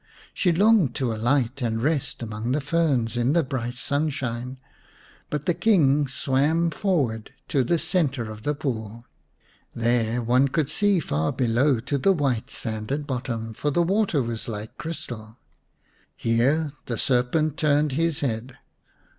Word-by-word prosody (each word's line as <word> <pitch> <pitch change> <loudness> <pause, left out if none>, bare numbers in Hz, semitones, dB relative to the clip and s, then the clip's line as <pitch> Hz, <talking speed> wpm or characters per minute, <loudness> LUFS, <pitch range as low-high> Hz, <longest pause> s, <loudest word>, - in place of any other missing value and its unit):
She 180 - +2
longed 195 - +4
to 125 -4 0
alight 120 +3 0
and 115 -2 0
rest 140 -1 -1
among 110 +2 -3
the 150 - +1
ferns 140 -6 +1
in 120 +3 +2
the 170 -1 +3
bright 125 -2 -4
sunshine, 130 -3 -2 0.7
but 150 0 -3
the 175 - +2
King 150 -9 +3
swam 145 +6 +1
forward 140 - -1 0.2
to 135 - +2
the 170 +8 +1
centre 135 -11 -1
of 110 0 -9
the 145 +6 -1
pool. 115 -5 -4 0.7
There 120 0 +1
one 125 +4 +3
could 150 +1 -1
see 205 +1 +3
far 80 - -1
below 125 +1 +2
to 140 +4 -2
the 195 +8 +4
white 135 -9 -1
sanded 115 +6 -3
bottom, 120 -4 -3
for 145 - -1
the 170 +4 +2
water 190 - +1
was 115 -1 -5
like 110 -1 -6
crystal. 120 -8 -6 0.8
Here 135 +7 +1 0.2
the 120 - -2
serpent 135 +6 +1
turned 150 -1 +2
his 165 +2 0
head. 125 0 -3
130 Hz, 145 wpm, -25 LUFS, 115-155 Hz, 0.8 s, longed